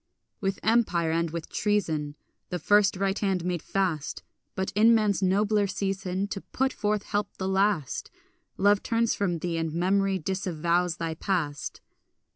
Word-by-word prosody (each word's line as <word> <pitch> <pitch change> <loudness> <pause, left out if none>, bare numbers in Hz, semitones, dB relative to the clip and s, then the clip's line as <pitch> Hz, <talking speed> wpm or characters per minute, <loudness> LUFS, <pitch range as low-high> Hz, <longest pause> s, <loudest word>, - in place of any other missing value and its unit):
With 195 -1 -1
empire 215 -8 +2
and 165 0 0
with 165 0 -5
treason 160 -8 -1 0.3
The 180 - -2
first 205 +1 +3
right 195 +1 0
hand 190 -4 0
made 180 -2 -1
fast, 175 -7 -2 0.3
But 190 0 -2
in 225 +3 +5
man's 210 -3 +2
nobler 205 +2 +2
season 195 -1 -2
To 195 - -4
put 265 0 -1
forth 210 -1 -1
help 205 -1 -3
the 190 - -2
last, 190 -6 0 0.5
Love 205 +1 +4
turns 230 -1 +1
from 180 -4 0
thee, 165 0 -2
and 160 -1 -2
memory 190 +3 +1
disavows 175 -1 0
thy 165 -1 -2
past. 160 -4 -2
190 Hz, 150 wpm, -27 LUFS, 170-205 Hz, 0.5 s, in